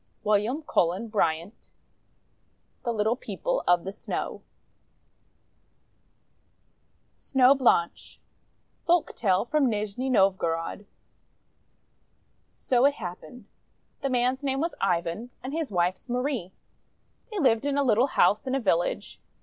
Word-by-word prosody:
WILLIAM 215 Hz, +8 st, +1 dB
CULLEN 190 Hz, -, 0 dB
BRYANT 170 Hz, -1 st, -2 dB, 1.1 s
(The 240 Hz, -, -1 dB
Little 220 Hz, +1 st, +1 dB
People -, -, -3 dB
of 175 Hz, -1 st, +4 dB
the 195 Hz, -, -5 dB
Snow) -, -, -5 dB, 2.8 s
SNOW 265 Hz, 0 st, +4 dB
BLANCHE 240 Hz, -11 st, +1 dB, 0.7 s
Folktale 235 Hz, -, +1 dB
from 290 Hz, -2 st, +2 dB
Nizhni 215 Hz, +4 st, -2 dB
Novgorod 190 Hz, -3 st, +1 dB, 1.6 s
So 250 Hz, 0 st, +1 dB
it 285 Hz, 0 st, +3 dB
happened: 205 Hz, +5 st, -9 dB, 0.3 s
— -, -, -44 dB
The 275 Hz, -, -1 dB
man's 255 Hz, +2 st, 0 dB
name 270 Hz, -1 st, -1 dB
was 335 Hz, +3 st, -1 dB
Ivan, 175 Hz, +4 st, -1 dB
and 260 Hz, +2 st, -5 dB
his 320 Hz, -2 st, -2 dB
wife's 180 Hz, +5 st, -1 dB
Marie. 250 Hz, -6 st, -2 dB, 0.8 s
They 425 Hz, -, -6 dB
lived 265 Hz, -, +2 dB
in 285 Hz, 0 st, 0 dB
a 285 Hz, -, +3 dB
little 240 Hz, 0 st, +3 dB
house 215 Hz, -2 st, +2 dB
in 260 Hz, -, 0 dB
a -, -, +1 dB
village. 175 Hz, -7 st, -1 dB
235 Hz, 115 wpm, -26 LUFS, 190-270 Hz, 2.8 s, of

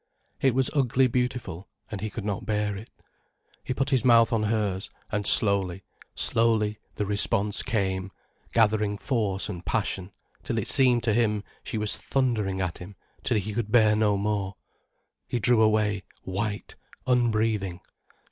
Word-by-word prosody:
It 135 Hz, -3 st, +3 dB
was 130 Hz, -1 st, +2 dB
ugly 130 Hz, -2 st, +3 dB
beautiful, 125 Hz, -7 st, -2 dB, 0.2 s
and 100 Hz, -3 st, -5 dB
he 110 Hz, -, -2 dB
could 105 Hz, 0 st, -6 dB
not 105 Hz, +1 st, -2 dB
bear 105 Hz, -1 st, 0 dB
it. 105 Hz, +4 st, -9 dB, 0.7 s
He -, -, -5 dB
put 135 Hz, +3 st, -1 dB
his 130 Hz, -3 st, +2 dB
mouth 115 Hz, -1 st, +5 dB
on 115 Hz, -, +2 dB
hers, 105 Hz, -3 st, -1 dB, 0.2 s
and 105 Hz, -2 st, 0 dB
slowly, 95 Hz, -3 st, +3 dB, 0.3 s
slowly 110 Hz, -2 st, +2 dB, 0.2 s
the 105 Hz, -, -1 dB
response 100 Hz, 0 st, +1 dB
came, 95 Hz, -5 st, -1 dB, 0.4 s
gathering 105 Hz, -2 st, +2 dB
force 105 Hz, -6 st, -1 dB
and 90 Hz, -4 st, -6 dB
passion, 95 Hz, +1 st, -2 dB, 0.3 s
till -, -, -3 dB
it -, -, -1 dB
seemed 125 Hz, -3 st, +4 dB
to 115 Hz, -, +2 dB
him 105 Hz, -2 st, +1 dB, 0.2 s
she -, -, -4 dB
was 105 Hz, -1 st, 0 dB
thundering 110 Hz, -8 st, -1 dB
at 90 Hz, -2 st, -3 dB
him 95 Hz, +3 st, -10 dB, 0.3 s
till -, -, +1 dB
he 105 Hz, +1 st, -3 dB
could 110 Hz, -1 st, -3 dB
bear 110 Hz, -2 st, +5 dB
no 105 Hz, -2 st, +2 dB
more. 100 Hz, -1 st, -1 dB, 0.7 s
He -, -, -1 dB
drew 115 Hz, +1 st, +3 dB
away, 105 Hz, -2 st, +2 dB, 0.2 s
white, 100 Hz, +2 st, -3 dB, 0.3 s
unbreathing. 110 Hz, -7 st, +1 dB
105 Hz, 155 wpm, -26 LUFS, 100-115 Hz, 0.7 s, mouth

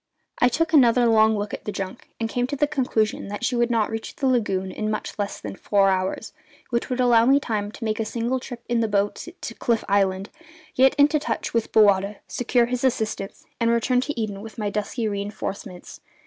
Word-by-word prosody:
I 245 Hz, -, +5 dB
took 325 Hz, +6 st, 0 dB
another 245 Hz, -4 st, +5 dB
long 220 Hz, -1 st, +4 dB
look 205 Hz, 0 st, -4 dB
at -, -, -6 dB
the 210 Hz, -, -2 dB
junk, 195 Hz, +4 st, -6 dB
and 225 Hz, -, -1 dB
came 245 Hz, +2 st, -1 dB
to 285 Hz, -, -3 dB
the 295 Hz, -, +2 dB
conclusion 250 Hz, -9 st, -1 dB
that 205 Hz, +4 st, -4 dB
she 250 Hz, -, 0 dB
could 240 Hz, 0 st, +2 dB
not 225 Hz, -3 st, +1 dB
reach 225 Hz, 0 st, -5 dB
the 275 Hz, -, -3 dB
lagoon 200 Hz, -7 st, +1 dB
in 215 Hz, +2 st, -3 dB
much 215 Hz, -, -3 dB
less 205 Hz, 0 st, -3 dB
than 100 Hz, -2 st, -7 dB
four 200 Hz, -1 st, +2 dB
hours, 185 Hz, 0 st, -2 dB, 0.4 s
which 235 Hz, 0 st, -1 dB
would 250 Hz, 0 st, -2 dB
allow 240 Hz, -2 st, +5 dB
me 275 Hz, +2 st, +5 dB
time 210 Hz, -6 st, -3 dB
to 230 Hz, -, -7 dB
make 215 Hz, 0 st, -1 dB
a -, -, +1 dB
single 235 Hz, +3 st, -2 dB
trip 245 Hz, -1 st, -9 dB
in 240 Hz, -1 st, +1 dB
the 225 Hz, -, +1 dB
boat 205 Hz, +5 st, -1 dB
to 230 Hz, -, -6 dB
Cliff 230 Hz, -1 st, 0 dB
Island, 195 Hz, 0 st, +1 dB, 0.4 s
get 265 Hz, +1 st, +4 dB
into 295 Hz, +1 st, +4 dB
touch -, -, -3 dB
with 230 Hz, -1 st, 0 dB
Bowata, 200 Hz, -1 st, +4 dB
secure 245 Hz, 0 st, +1 dB
his 245 Hz, +1 st, -3 dB
assistance, 220 Hz, -6 st, -2 dB
and 230 Hz, -1 st, +2 dB
return 240 Hz, +2 st, +2 dB
to 280 Hz, -1 st, -4 dB
Eden 205 Hz, -3 st, -3 dB
with 220 Hz, +2 st, -10 dB
my 210 Hz, -2 st, -2 dB
dusky 215 Hz, +3 st, -2 dB
reinforcements. 200 Hz, -3 st, -6 dB
225 Hz, 215 wpm, -24 LUFS, 205-245 Hz, 0.4 s, I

